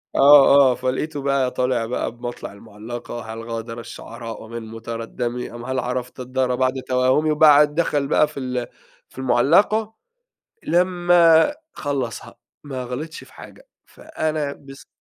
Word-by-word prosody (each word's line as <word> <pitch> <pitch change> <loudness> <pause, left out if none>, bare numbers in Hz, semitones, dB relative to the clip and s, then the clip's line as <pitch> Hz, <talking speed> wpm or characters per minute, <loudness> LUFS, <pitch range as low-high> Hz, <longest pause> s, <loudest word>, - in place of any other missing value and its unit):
آه، 140 0 +7
آه، - - -1
فلقيته 140 +4 -3
بقى 135 -2 0
طالع 125 -2 0
بقى 120 - -3
بمطلع 120 -3 -7
المُعلّقة: 115 +4 -8
"هل 115 0 -8
غادر 115 0 -5
الشعراء 115 -1 -9
من 115 0 -7
متردّمِ 115 +2 -5
أم 120 0 -8
هل 130 0 -2
عرفتَ 125 +1 -4
الدار 130 0 -1
بعد 130 +1 +1
توهّمِ"، 130 +5 +2
وبعد 150 -1 +5
دخل 145 -4 0
بقى 150 - +3
في 150 -2 -9
ال 125 -2 -3 0.4
في - - -22
المُعلّقة، 175 - +2 0.7
لمّا 175 - +4 0.2
خلّصها، 135 -5 -4 0.3
ما 130 -3 -5
غلطش 145 +7 -7
في - - -20
حاجة، - - -14 0.2
فأنا 155 -2 -4
بس 135 -1 -14
130 Hz, 135 wpm, -21 LUFS, 120-150 Hz, 0.7 s, آه